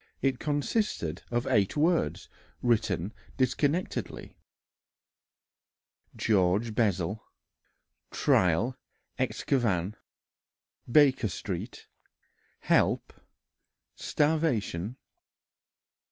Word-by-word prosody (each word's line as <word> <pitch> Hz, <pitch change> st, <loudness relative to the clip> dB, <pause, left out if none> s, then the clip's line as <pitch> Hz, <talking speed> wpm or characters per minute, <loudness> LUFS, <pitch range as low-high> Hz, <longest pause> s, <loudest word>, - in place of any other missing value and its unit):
It 135 Hz, -2 st, 0 dB
consisted 145 Hz, -, -1 dB
of 120 Hz, +1 st, -1 dB
eight 105 Hz, -2 st, +1 dB
words 145 Hz, -, +1 dB, 0.4 s
written 110 Hz, -5 st, +1 dB, 0.2 s
disconnectedly: 145 Hz, +6 st, -1 dB, 1.8 s
"George 105 Hz, +2 st, +2 dB
Bessel... 100 Hz, -2 st, 0 dB, 0.9 s
trial 95 Hz, +8 st, +2 dB, 0.4 s
excavn... 105 Hz, -8 st, 0 dB, 1.0 s
Baker 135 Hz, -5 st, +5 dB
Street... 95 Hz, -, -5 dB, 0.8 s
help... -, -, +2 dB, 0.8 s
starvation." 130 Hz, -, 0 dB
115 Hz, 55 wpm, -29 LUFS, 95-140 Hz, 1.8 s, Baker